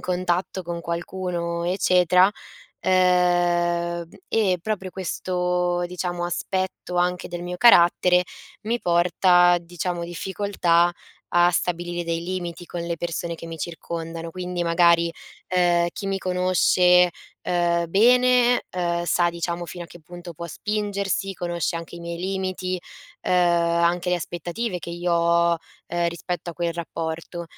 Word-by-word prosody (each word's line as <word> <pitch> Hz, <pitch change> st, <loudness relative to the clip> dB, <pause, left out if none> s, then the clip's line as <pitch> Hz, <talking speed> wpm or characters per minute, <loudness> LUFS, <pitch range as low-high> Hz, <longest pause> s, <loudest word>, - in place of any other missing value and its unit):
contatto 180 Hz, +1 st, -1 dB
con 170 Hz, -1 st, -5 dB
qualcuno 170 Hz, 0 st, -3 dB
eccetera, 180 Hz, 0 st, +4 dB, 0.6 s
uhm. 185 Hz, -1 st, +4 dB, 1.1 s
E 195 Hz, -5 st, +2 dB
proprio 190 Hz, -3 st, -3 dB
questo, 180 Hz, -1 st, -1 dB
diciamo 175 Hz, 0 st, -3 dB
aspetto 185 Hz, +1 st, -3 dB
anche 180 Hz, 0 st, 0 dB
del 175 Hz, 0 st, -6 dB
mio 180 Hz, 0 st, -5 dB
carattere 180 Hz, -4 st, +6 dB, 0.4 s
mi 235 Hz, +3 st, -1 dB
porta, 175 Hz, 0 st, +4 dB
diciamo, 175 Hz, 0 st, -4 dB
difficoltà 175 Hz, -1 st, +1 dB, 0.4 s
a 175 Hz, 0 st, +5 dB
stabilire 175 Hz, 0 st, -2 dB
dei 165 Hz, 0 st, -2 dB
limiti 175 Hz, -1 st, -5 dB
con 175 Hz, -, -5 dB
le 170 Hz, 0 st, -3 dB
persone 170 Hz, 0 st, -3 dB
che 165 Hz, -, -9 dB
mi 165 Hz, -1 st, -7 dB
circondano. 165 Hz, 0 st, -5 dB
Quindi 180 Hz, 0 st, -4 dB
magari, 170 Hz, 0 st, +4 dB, 0.4 s
uhm, 175 Hz, -1 st, +3 dB
chi 200 Hz, -, -6 dB
mi 195 Hz, 0 st, -1 dB
conosce, 180 Hz, -1 st, +3 dB, 0.3 s
uhm, 170 Hz, -1 st, +1 dB
bene, 245 Hz, +4 st, +4 dB
uhm, 170 Hz, -1 st, 0 dB
sa 175 Hz, 0 st, +2 dB
diciamo 170 Hz, 0 st, -4 dB
fino 175 Hz, 0 st, -7 dB
a -, -, -12 dB
che 175 Hz, -, -14 dB
punto 175 Hz, +2 st, -10 dB
può 170 Hz, +2 st, -7 dB
spingersi, 200 Hz, +1 st, -2 dB
conosce 175 Hz, -2 st, -2 dB
anche 165 Hz, +1 st, -8 dB
i -, -, -10 dB
miei 170 Hz, 0 st, -5 dB
limiti, 185 Hz, 0 st, -3 dB, 0.4 s
uhm, -, -, -1 dB
anche 170 Hz, 0 st, +2 dB
le 180 Hz, -, +2 dB
aspettative 175 Hz, +5 st, -4 dB
che 170 Hz, -, -9 dB
io 175 Hz, +1 st, -2 dB
ho, 170 Hz, 0 st, +3 dB, 0.4 s
uhm, 175 Hz, 0 st, 0 dB
rispetto 170 Hz, 0 st, -5 dB
a -, -, -9 dB
quel 170 Hz, 0 st, -1 dB
rapporto. 165 Hz, 0 st, -5 dB
175 Hz, 135 wpm, -23 LUFS, 170-180 Hz, 1.1 s, carattere